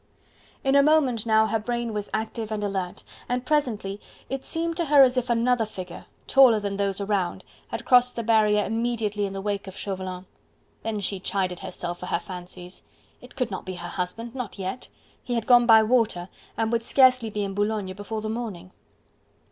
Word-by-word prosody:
In 270 -1 +2
a 280 - +7
moment 275 -7 +3
now 220 0 +5
her 220 +1 0
brain 235 +1 -3
was 210 -1 -4
active 220 0 -3
and 210 -1 -2
alert, 190 -3 -3 0.3
and 250 +1 -1
presently 230 -9 -1 0.3
it 270 0 -3
seemed 330 0 -2
to 340 - +1
her 290 -2 +7
as 255 -1 +3
if 250 0 -1
another 235 0 +2
figure 185 -5 -8 0.2
taller 255 -5 +6
than 200 -1 -3
those 200 -1 -1
around 200 -3 -1 0.2
had - - -6
crossed 250 -1 +5
the 235 - -3
barrier 210 -2 +3
immediately 220 -2 -1
in 195 - -7
the 195 - -4
wake 200 -1 -3
of 190 - -9
Chauvelin. 185 -2 -5 0.6
Then 220 -2 -3
she 195 0 -2
chided 185 -1 -2
herself 175 -1 -5
for 180 - -6
her - - +1
fancies! 180 0 -8 0.4
It - - -14
could 250 -5 -2
not 190 - -4
be 185 -1 -6
her 175 0 -7
husband. 225 +6 -4
Not 250 -6 -5
yet! 190 +5 -5 0.3
He 245 - -2
had 230 -2 -1
gone 240 -1 +6
by 220 -1 +8
water, 215 -6 +1 0.3
and 225 0 0
would 235 -1 +1
scarce 255 +1 +5
be 215 -3 -3
in 195 -1 -3
Boulogne 205 -1 -1
before 205 +3 -5
the 215 - -4
morning! 210 -6 -5
215 Hz, 195 wpm, -25 LUFS, 195-240 Hz, 0.6 s, by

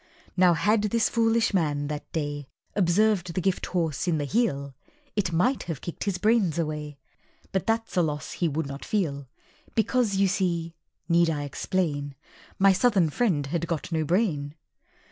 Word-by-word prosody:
Now, 180 -1 +5
had 210 +6 +2
this 220 +1 +2
foolish 230 -1 +2
man, 150 -6 +1
that 150 -1 -6
day, 145 -3 -3 0.3
Observed 185 -1 +2
the - - +1
Gifthorse 175 -4 -1
in 165 -3 +2
the 145 - -1
Heel, 140 - 0 0.4
It 195 -4 0
might 240 +11 +2
have 160 -5 -3
kicked 170 - -5
his 200 -3 0
brains 205 -4 +2
away, 150 -3 -3 0.5
But 190 - -1
that's 225 -1 0
a - - +6
loss 150 -3 -2
he 175 - 0
would 160 +1 -1
not 140 0 -7
feel; 140 -10 -1 0.5
Because 225 -2 +2
you 195 0 +3
see 170 -3 -1 0.3
(need 170 0 +4
I 150 -2 -1
explain?) 145 -2 -2 0.4
My 195 0 +6
Southern 190 -6 +3
friend 170 -9 +1
had 170 +4 -2
got 165 +1 -3
no 160 -1 +1
brain. 155 -5 0
170 Hz, 165 wpm, -26 LUFS, 150-200 Hz, 0.5 s, a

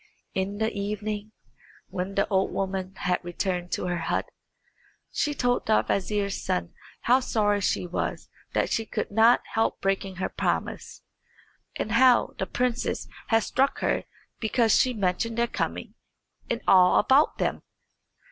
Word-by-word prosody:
In 190 +2 -2
the 220 +1 0
evening, 210 +1 -4 0.6
when 185 +2 -4
the 200 - +2
old 190 -2 +1
woman 190 0 -3
had 180 -1 -1
returned 175 0 -3
to - - -1
her 175 -1 -1
hut, - - -1 0.9
she 295 -1 -1
told 245 -2 0
the 215 - +4
vizier's 200 0 -1
son 185 -1 -2 0.3
how 250 +2 +4
sorry 205 -5 +1
she 185 - 0
was 175 - -3 0.3
that - - +1
she 225 - +1
could 220 - -4
not 225 +3 +5
help 225 - +1
breaking 195 -1 -1
her 185 - -2
promise, - - -3 0.7
and 215 - -3
how 245 +1 +5
the 190 - -1
princess 245 +4 -1 0.2
had 225 -1 +3
struck 270 +1 +1
her - - 0 0.3
because 225 -1 +2
she 255 -1 +3
mentioned 205 +3 -1
their 235 - +3
coming - - -4 0.6
and 235 0 -1
all 180 -1 +6
about 280 +4 +4
them. - - -1
205 Hz, 145 wpm, -26 LUFS, 190-230 Hz, 0.9 s, all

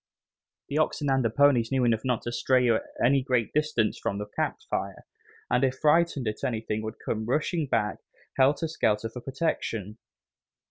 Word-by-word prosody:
The 145 - 0
oxen 145 -2 0
and 135 -1 +2
the 115 - +2
ponies 125 -1 +3
knew 130 -2 +2
enough 115 -2 +1
not 125 -3 -1
to 120 - -3
stray 125 +1 +2 0.4
any 135 +2 +4
great 125 -4 0
distance 150 -8 +1
from 100 - -2
the 105 - -4
campfire, 105 - -4 0.4
and 125 - +1
if 130 0 +1
frightened 150 -4 +2
at 105 - -4
anything 110 -2 -2
would 110 0 -6
come 110 0 -2
rushing 155 +4 0
back, 110 -5 0 0.4
helter 140 +5 +3
skelter, 115 -8 0
for 125 +2 -8
protection. 115 - -3
125 Hz, 165 wpm, -27 LUFS, 110-140 Hz, 0.4 s, any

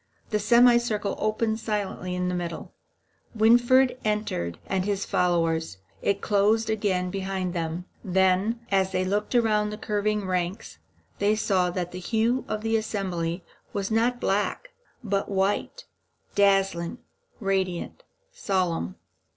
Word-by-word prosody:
The 210 - +1
semicircle 235 -2 +4
opened 220 +1 0
silently 200 -4 -3
in 180 0 -1
the 180 - -1
middle; 175 -2 -5 0.6
Winfried 245 +3 +4
entered 210 - -1
with 190 -1 0
his 200 -1 -1
followers; 165 - 0 0.2
it 200 0 0
closed 215 +2 +2
again 190 -4 0
behind 190 -2 -3
them. 170 0 -3 0.2
Then, 190 +4 +2
as 190 -1 +2
they 185 0 +1
looked 205 +5 -1
round 215 -3 +2
the 210 - -5
curving 210 -1 -1
ranks, 180 - -3 0.4
they 205 +1 +3
saw 190 -4 +1
that 175 0 -3
the 180 - -6
hue 230 +6 0
of 215 -1 -3
the 225 0 +1
assemblage 185 -5 -2 0.3
was 200 +1 -2
not 235 +2 +2
black, 210 - -1 0.3
but 200 -2 -1
white, 200 - -1 0.5
dazzling, 195 -1 +2 0.4
radiant, 190 - -2 0.3
solemn. 175 - -1
200 Hz, 125 wpm, -26 LUFS, 180-220 Hz, 0.6 s, semicircle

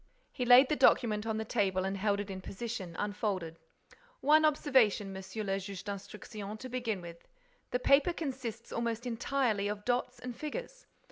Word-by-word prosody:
He 250 - -3
laid 250 +2 +8
the 300 - +1
document 220 -6 +3
on 220 -1 -1
the 220 - -3
table 190 -4 +1
and 195 +1 -1
held 200 +1 +1
it 205 -1 -4
in 190 0 -6
position, 195 -4 -5
unfolded: 200 -5 -2 0.6
"One 310 +2 +5
observation, 255 -10 +3
Monsieur 190 +3 -5
le 195 -1 -1
Juge 195 -1 -7
d'Instruction, 205 +1 -7
to 255 +3 -8
begin 235 -6 -2
with. 170 -1 -11 0.4
The - - +1
paper 275 +6 +4
consists 255 -8 -5
almost 235 0 -2
entirely 235 -3 0
of 210 0 -4
dots 250 0 0
and 250 -1 -7
figures. - - -6
220 Hz, 165 wpm, -32 LUFS, 200-255 Hz, 0.6 s, laid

